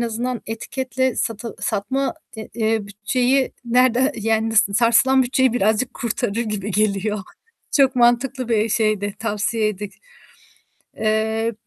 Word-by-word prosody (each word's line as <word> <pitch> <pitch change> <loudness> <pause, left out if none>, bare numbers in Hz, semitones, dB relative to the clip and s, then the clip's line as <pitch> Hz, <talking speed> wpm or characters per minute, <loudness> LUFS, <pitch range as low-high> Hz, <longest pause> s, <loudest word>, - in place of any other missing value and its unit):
azından 235 +1 -2
etiketle 260 +3 -2
satıl 225 +1 -3
satma, 265 +8 -1 0.4
eee, 225 -1 +1
bütçeyi 245 +6 0
nerede 250 +3 +3
yani 225 +1 0
sarsılan 230 +6 +4
bütçeyi 260 -1 +2
birazcık 225 +2 +1
kurtarır 240 -2 -2
gibi 210 -1 -4
geliyor. 210 +1 0 0.5
Çok 270 -2 +3
mantıklı 245 +1 +2
bir 220 -1 +2
şeydi, 210 -2 0
tavsiyeydi. 215 -1 -1 1.1
Eee, 220 +1 0
225 Hz, 105 wpm, -21 LUFS, 215-255 Hz, 1.1 s, sarsılan